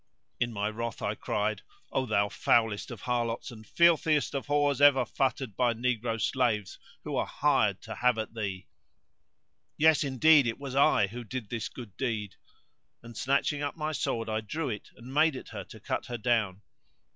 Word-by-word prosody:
In 120 -1 0
my 105 -1 -2
wrath 115 +1 -4
I - - 0
cried:—O 130 - -3
thou 100 -2 +2
foulest 110 0 +1
of - - -8
harlots 120 0 -2
and 110 -2 -12
filthiest 160 -3 +3
of 140 0 -3
whores 145 -1 +2
ever 145 -2 +6
futtered 130 -5 -1
by 120 -2 +2
negro 115 -1 -1
slaves 110 -6 0 0.2
who - - -4
are - - 0
hired - - +1
to - - -6
have 125 -1 +2
at 110 0 -4
thee![FN#129] 100 -5 -4 1.1
Yes 160 0 +5
indeed 140 +1 +5
it 115 - -2
was 140 -2 -7
I 135 -6 +4
who 120 +5 -7
did 120 -1 -6
this 115 -2 -3
good 115 -7 -10
deed; 110 -6 -2 0.7
and 115 0 -11
snatching 140 +4 0
up 145 +2 -3
my 155 0 -2
sword 120 -5 -2
I 110 0 -1
drew 145 +8 -3
it 105 - -7
and 125 +3 -10
made 155 0 +4
at - - -8
her - - -6
to - - -13
cut - - -3
her 120 - -4
down. 105 -4 0
120 Hz, 180 wpm, -29 LUFS, 110-140 Hz, 1.1 s, ever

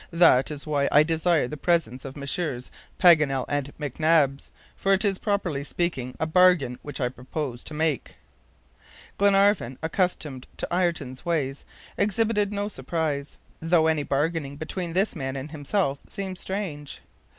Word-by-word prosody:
That 165 -7 +5
is 150 -1 -6
why 145 -2 +1
I 150 - +7
desire 160 -2 +1
the 150 - -6
presence 140 -7 0
of 135 +1 -8
Messrs. 140 -2 -3 0.3
Paganel 150 -8 +5
and 145 -1 -2
McNabbs, 145 -1 +1 0.3
for 195 - +2
it 195 +3 +2
is, 195 -2 +1
properly 190 -9 -1
speaking, 140 -6 -2
a - - +1
bargain 160 -7 +4
which 145 -2 -7
I 125 - +1
propose 130 0 -5
to 155 - -7
make." 155 -2 -1 1.0
Glenarvan, 200 - +3
accustomed 160 -6 -1
to - - -2
Ayrton's 165 -8 -1
ways, 145 -5 -2 0.3
exhibited 210 0 +1
no 205 0 -2
surprise, 155 -8 -3 0.2
though 165 0 +3
any 160 -2 +2
bargaining 145 0 -1
between 165 +2 -4
this 195 +4 +1
man 135 0 -4
and 135 +3 -6
himself 145 -1 -1
seemed 190 -2 -5
strange. 170 -8 -5
155 Hz, 145 wpm, -25 LUFS, 140-180 Hz, 1.0 s, I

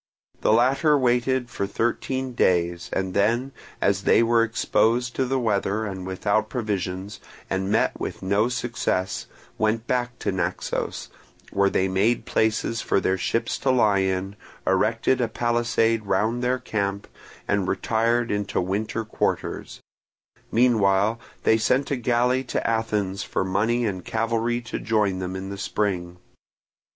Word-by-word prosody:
The - - +3
latter 135 +6 +4
waited 125 -1 +1
for 100 - -2
thirteen 125 +4 -2
days, 85 -5 +1
and 95 -1 -2
then, 115 +7 +1 0.3
as - - +2
they - - +4
were 115 0 +4
exposed 115 +1 +1
to 130 - +1
the 135 +1 0
weather 110 -2 0
and 95 -2 -5
without 100 +3 0
provisions, 100 -3 -3 0.3
and 95 0 -1
met 110 - +1
with - - -5
no 100 +5 +2
success, 120 -6 -2 0.3
went 110 +1 +1
back 120 0 -1
to - - -2
Naxos, 90 -1 -3 0.4
where 100 0 +3
they 95 0 +1
made 100 +6 +1
places 110 +1 0
for - - +1
their 95 - +1
ships 115 +5 -1
to 135 - 0
lie 110 -6 +4
in, 95 +1 -1 0.3
erected 115 +6 +2
a 120 - +2
palisade 115 -1 +1
round 110 +6 +1
their 125 +1 +2
camp, 100 -4 -3 0.4
and 100 -2 +1
retired 115 +3 +1
into 105 -1 -1
winter 105 +4 -2
quarters; 110 - -3 0.7
meanwhile 110 -2 +3 0.2
they 110 - +4
sent 130 +6 +1
a - - +2
galley 125 +1 +1
to - - -2
Athens 105 -4 -1
for - - -1
money 110 +6 +1
and 95 -4 -3
cavalry 115 +1 -1
to 115 - -5
join 105 -4 +1
them 95 0 -4
in 95 +1 -5
the 100 - -6
spring. 90 -3 -2
110 Hz, 145 wpm, -24 LUFS, 95-120 Hz, 0.7 s, latter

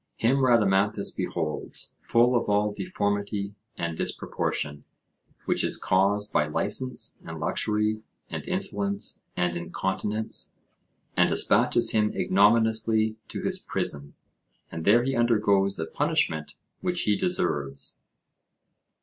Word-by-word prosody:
Him 120 +4 +2
Rhadamanthus 105 -5 +2
beholds, 85 -4 -4
full 120 +2 +3
of 120 - 0
all 105 0 +2
deformity 100 - -2 0.2
and 85 -1 -3
disproportion, 75 -2 -2 0.6
which - - +1
is - - +2
caused 100 +2 +1
by 75 - +2
licence 105 +11 -1
and - - -7
luxury 105 0 0 0.3
and - - -5
insolence 100 -1 -1 0.2
and 90 -1 0
incontinence, 95 +5 -3 0.6
and - - +4
despatches - - +4
him 105 -1 +2
ignominiously 110 +1 +3
to - - -6
his - - 0
prison, 70 0 -2 0.6
and 80 -1 -6
there 120 +4 +5
he 135 +1 -1
undergoes 105 -5 +2
the 80 - -3
punishment 80 -1 -1 0.2
which 180 -2 -1
he 105 - +2
deserves. 70 - -2
105 Hz, 115 wpm, -26 LUFS, 95-110 Hz, 0.6 s, there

